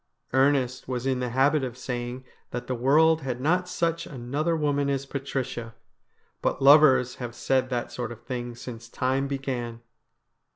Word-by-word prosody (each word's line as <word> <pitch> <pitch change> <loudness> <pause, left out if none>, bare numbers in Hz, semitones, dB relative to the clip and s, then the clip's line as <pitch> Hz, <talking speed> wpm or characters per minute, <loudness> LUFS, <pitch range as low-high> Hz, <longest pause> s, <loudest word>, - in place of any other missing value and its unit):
Ernest 130 -2 +2
was 125 -1 -3
in 130 -1 +1
the 125 -1 -2
habit 135 +4 +3
of 125 -1 -4
saying 125 0 -5 0.2
that 120 0 -5
the 130 - -2
world 155 +6 +4
had 125 -3 -3
not 180 +6 +1
such 165 -2 -1
another 145 +5 -2
woman 145 -2 +1
as 140 -1 -1
Patricia; 130 -4 -4 0.7
but - - 0
lovers 135 -3 +6
have 120 -2 -6
said 130 +2 +1
that 120 -2 -2
sort 120 -2 -4
of 120 0 -10
thing 120 -1 -5
since 115 -1 -9
time 130 +3 0
began. 125 -4 -4
130 Hz, 160 wpm, -26 LUFS, 120-140 Hz, 0.7 s, lovers